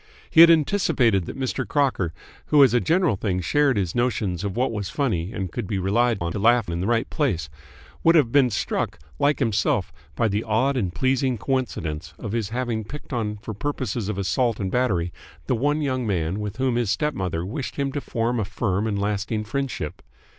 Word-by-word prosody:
He 160 - +8
had 170 - +10
anticipated 140 - +3
that - - -6
Mr. 130 -1 -2
Crocker, 130 - +1 0.4
who 145 -2 +6
as 130 -4 +4
a 120 - +4
general 170 - +2
thing 95 -2 -1
shared 140 - +2
his 90 -4 -1
notions 105 -7 -1
of 100 0 -3
what 125 0 +1
was 105 -3 -3
funny 105 - -1
and 95 -5 -4
could 115 0 -4
be 100 - -2
relied 115 +5 +2
on 85 0 -1
to 100 - -3
laugh 120 -1 +3
in 85 +1 -2
the 95 - -1
right 115 -1 +1
place, 95 - 0 0.5
would 165 +1 +5
have 140 -8 +4
been 135 -2 +5
struck, 105 - -2 0.2
like 145 +1 +3
himself, 110 -6 0 0.2
by 115 - +2
the 105 +1 -1
odd 130 +6 +1
and 95 -9 -1
pleasing 130 -1 +1
coincidence 85 - -3
of 105 - -6
his 110 -3 -1
having 120 -2 -2
picked 145 +5 -9
on 105 -3 -2
for 110 - -5
purposes 125 -2 -3
of 105 - -3
assault 105 +5 0
and 95 -2 -2
battery 95 -9 0 0.3
the - - 0
one 145 +5 +1
young 130 -4 -1
man 90 -1 -1
with 105 +1 -5
whom 130 -2 +1
his 120 -4 0
stepmother 95 - -1
wished 130 +8 -5
him 140 -1 -1
to 145 +1 -3
form 120 -1 -1
a - - +1
firm 100 +1 -1
and 105 -2 -1
lasting 105 +2 -1
friendship. 135 +4 -4
115 Hz, 205 wpm, -24 LUFS, 100-130 Hz, 0.5 s, had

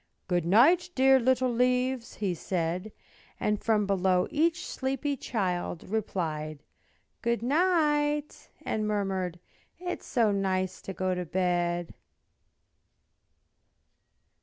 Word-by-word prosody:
"Good 175 -2 0
night, 310 - +5
dear 265 0 +6
little 255 0 +2
leaves" 250 0 0
he 200 -4 -1
said; 175 +3 -2 0.5
And 210 -1 0
from 215 -2 +2
below 190 -2 +2
each 335 +4 +1
sleepy 270 +2 -2
child 180 -9 -3
Replied 155 -8 -3 0.6
"Good 235 -1 0
night," 295 -1 +1 0.2
and 215 -1 -1
murmured, 190 -4 -1 0.4
"It 355 0 -4
is - - -17
so 230 -5 +2
nice 190 -2 -1
to 195 - -6
go 185 0 -1
to 180 0 -2
bed." 175 -1 0
210 Hz, 110 wpm, -28 LUFS, 180-265 Hz, 0.6 s, dear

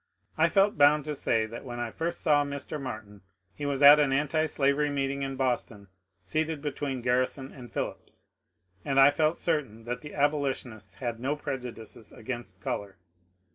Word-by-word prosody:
I - - +3
felt 200 -4 +3
bound 145 0 +5
to 150 - -2
say 115 -5 +1
that 115 +2 -8
when 120 -2 -6
I 120 -1 -3
first 170 +5 -3
saw 145 -2 +4
Mr. 140 +1 -5
Martin 110 -5 -7 0.3
he 145 - -4
was 140 0 0
at 145 +1 +10
an 145 -2 +3
antislavery 150 0 +1
meeting 140 -1 -1
in 135 0 -3
Boston 120 -6 -2 0.3
seated 155 - -1
between 140 -3 -3
Garrison 130 +2 0
and 120 -4 -11
Phillips, - - -6 0.6
and 135 -1 +1
I 135 +1 +8
felt 155 +2 +1
certain 135 -10 -1
that 120 +2 -4
the 150 - -9
abolitionists 135 -9 -1
had 120 -2 -4
no 135 +4 -1
prejudices 120 -6 -7
against 110 -5 -7
colour. 100 -2 -4
135 Hz, 165 wpm, -28 LUFS, 120-145 Hz, 0.6 s, at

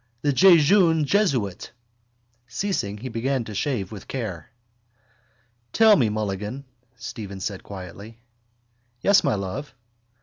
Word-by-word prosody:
The 145 - +2
jejune 170 0 +5
jesuit! 135 - 0 0.7
Ceasing, 115 - -2
he 125 +5 -6
began 125 +3 -1
to 110 - -8
shave 105 -3 -2
with 105 -3 -9
care. 105 - -5 1.2
—Tell 220 -2 +6
me, 120 - +2
Mulligan, 105 +5 -4 0.3
Stephen 100 -5 -7
said 100 0 -4
quietly. 100 +3 -10 0.9
—Yes, 200 -1 +5
my 140 -7 +1
love? 100 +8 -5
115 Hz, 110 wpm, -24 LUFS, 100-150 Hz, 1.2 s, Tell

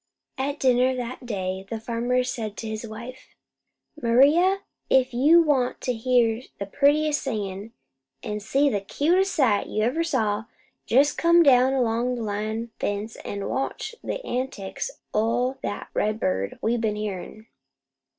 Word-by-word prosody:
At 280 +2 -2
dinner 255 0 +3
that 250 0 -6
day, 190 -3 -3
the 225 - -4
farmer 240 +2 0
said 220 -4 -4
to 225 - -5
his 220 +1 -5
wife: 240 +4 -10 0.7
"Maria, 295 +11 +4 0.3
if 260 -1 +3
you 305 +8 +6
want 270 -5 +1
to 250 - -1
hear 235 -1 +2 0.2
the 200 - -4
prettiest 295 +7 +2
singin', 210 -4 -4 0.5
an' 210 0 -3
see 270 +7 +1
the 205 -8 0
cutest 355 - +1
sight 235 -9 +2
you 215 - -1
ever 275 +9 +1
saw, 220 -9 0 0.4
jest 280 +5 +3
come 340 0 +5
down 260 -2 +5
along 245 -1 0
the 235 - -4
line 215 +2 -3
fence 205 +2 -3
an' 200 -1 -5
watch 270 +10 -3
the - - -4
antics 250 - -3 0.2
o' 240 +4 0
that 205 - -5
redbird 100 - -1
we 230 +2 +1
been 220 -2 -1
hearin'." 210 +1 -6
240 Hz, 145 wpm, -25 LUFS, 215-270 Hz, 0.7 s, you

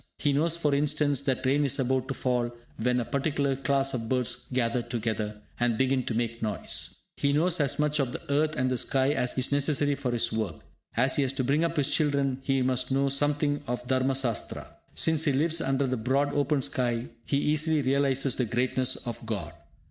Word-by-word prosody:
He 145 - +1
knows, 165 +4 +1
for 150 -4 +1
instance, 145 -1 +1
that 135 -1 -1
rain 140 +3 +3
is 140 - +1
about 130 0 0
to 135 - -3
fall 125 -2 0 0.3
when 125 +2 +1
a 120 - -2
particular 140 0 0
class 135 0 0
of 115 -3 -3
birds 125 -1 -1
gather 125 -1 0
together, 110 -3 -3 0.2
and 120 -2 +1
begin 130 0 +1
to 115 - -1
make 115 0 -2
noise. 105 -2 -3 0.2
He 140 - +1
knows 170 +4 +2
as 140 -3 +1
much 150 0 +1
of 135 -3 0
the 160 +2 -7
earth 155 +1 +1
and 130 0 0
the 125 - +1
sky 135 0 +1
as 125 -4 0
is 130 +1 +1
necessary 145 0 +2
for 140 -2 -3
his 115 -1 +1
work. 110 -7 -2 0.4
As 130 +3 +4
he - - +3
has 135 -1 +1
to 135 -1 -1
bring 140 +5 +2
up 170 0 -1
his 145 -1 +2
children, 140 -4 +1
he 135 -1 +1
must 125 0 0
know 135 +1 +2
something 145 +1 +1
of 125 0 -3
Dharma 130 +1 +1
Sastra. 125 -5 -2 0.2
Since 160 0 +2
he 145 - +3
lives 160 +4 +1
under 135 +1 +1
the 130 -1 -1
broad 135 +5 +1
open 145 -1 +1
sky, 120 -2 -1 0.2
he 140 - +1
easily 155 +1 +1
realises 135 0 +2
the 125 - 0
greatness 125 +2 +1
of 120 0 -5
God. 95 -8 -4
135 Hz, 210 wpm, -28 LUFS, 125-145 Hz, 0.4 s, As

